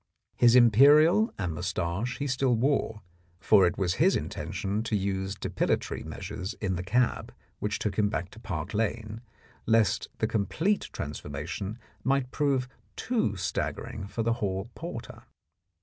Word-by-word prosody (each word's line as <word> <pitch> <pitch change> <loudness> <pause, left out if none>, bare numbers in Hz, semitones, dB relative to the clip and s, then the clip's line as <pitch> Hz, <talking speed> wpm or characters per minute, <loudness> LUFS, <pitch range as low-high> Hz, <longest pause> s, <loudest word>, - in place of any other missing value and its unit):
His 120 0 +5
imperial 145 - +6
and 90 -5 -2
moustache 95 +10 -2
he 145 - -3
still 130 -2 +2
wore, 115 -3 0 0.4
for 100 -2 +5
it 85 - -2
was 90 -3 +1
his 190 +4 +5
intention 95 +6 -3
to 110 -1 -1
use 95 -1 -1
depilatory - - -1
measures 95 +4 -6
in 95 -3 -2
the 90 - -3
cab 120 +7 0 0.3
which 105 0 -1
took 105 0 -2
him 105 -1 +3
back 90 -4 -3
to 115 - -13
Park 95 -4 -5
Lane 110 +1 -2 0.5
lest 110 -4 +2
the - - 0
complete 135 - 0
transformation 95 +7 -5 0.3
might 135 -1 +1
prove 135 -3 +1 0.3
too 220 - 0
staggering 100 +1 -3
for 115 +3 -3
the 115 +1 +2
hall 95 +2 -2
porter. 165 -9 -7
110 Hz, 145 wpm, -28 LUFS, 95-125 Hz, 0.5 s, imperial